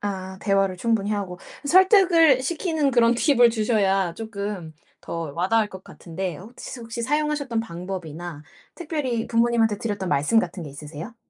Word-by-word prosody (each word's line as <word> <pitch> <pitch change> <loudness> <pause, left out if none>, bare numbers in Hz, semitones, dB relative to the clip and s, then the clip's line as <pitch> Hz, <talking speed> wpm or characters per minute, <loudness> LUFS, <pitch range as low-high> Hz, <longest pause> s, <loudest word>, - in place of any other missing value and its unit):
아 190 -2 -5
대화를 195 -2 +1
충분히 215 0 0
하고 190 -3 -4 0.3
설득을 350 - +5
시키는 315 -1 0
그런 235 -2 +4
팁을 245 -1 +4
주셔야 200 -5 +1
쪼끔 200 -6 -5 0.3
더 165 -3 -5
와닿을 210 +5 +1
것 190 -2 -11
같은데 175 0 -6
혹시 240 +5 -10
혹시 230 0 -6
사용하셨던 290 -3 0
방법이나 175 -5 -7 0.3
특별히 295 -9 -3
부모님한테 230 -2 +2
드렸던 205 -5 -3
말씀 150 +10 +2
같은 180 -1 -5
게 150 - -8
있으세요? 150 - -9
215 Hz, 345 characters per minute, -24 LUFS, 185-245 Hz, 0.3 s, 설득을